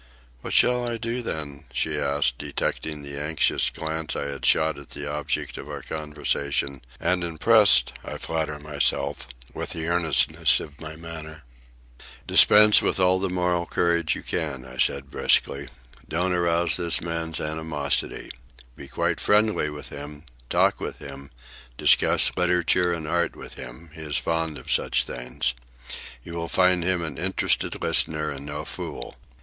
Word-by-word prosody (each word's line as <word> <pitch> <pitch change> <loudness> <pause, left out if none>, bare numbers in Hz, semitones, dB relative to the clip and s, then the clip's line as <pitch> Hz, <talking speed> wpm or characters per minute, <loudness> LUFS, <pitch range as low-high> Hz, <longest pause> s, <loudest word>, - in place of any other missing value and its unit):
"What - - -5
shall 125 0 +4
I 120 -1 -2
do, 115 +2 -3
then?" 75 - -6
she - - -1
asked, 70 -3 +2
detecting 75 -2 -3
the 70 0 -6
anxious 80 +1 +1
glance 80 0 -3
I - - -2
had 70 -2 -6
shot 80 -2 +3
at 70 - -13
the 70 - -7
object 75 -1 -3
of - - -9
our - - -6
conversation, 70 -3 -2 0.2
and 90 +1 +1
impressed, 85 - +5
I - - -6
flatter 80 -2 -2
myself, 75 -4 -1 0.3
with - - -5
the 80 -1 -4
earnestness 85 -3 +2
of 75 -1 -10
my 80 0 -7
manner. 80 -1 -9 0.8
"Dispense 105 0 +7
with - - 0
all 95 0 +3
the 95 0 -1
moral 90 -1 0
courage 85 -2 +1
you - - -8
can," 70 -5 -3
I 65 0 -11
said 70 +1 0
briskly. 70 +1 +1 0.4
"Don't 90 +3 0
arouse 85 -2 +2
this 85 -2 +2
man's 80 -1 -3
animosity. 75 -2 -2 0.4
Be 70 - -11
quite - - -1
friendly 105 -6 +2
with 75 0 -6
him, 75 +1 -9 0.3
talk - - +2
with - - -5
him, 70 0 -10 0.5
discuss - - +4
literature 90 0 +2
and 80 -2 -4
art 85 +2 0
with - - -8
him—he 80 +6 -11
is 75 -1 -1
fond 80 -2 -1
of - - -6
such - - +1
things. 60 0 -2 0.7
You 85 - -9
will 85 0 -4
find 90 -1 +3
him 90 -1 0
an 75 -4 -5
interested 95 +2 0
listener 75 -1 +3
and 70 0 -7
no 75 +1 -5
fool. - - -7
80 Hz, 155 wpm, -25 LUFS, 75-85 Hz, 0.8 s, Dispense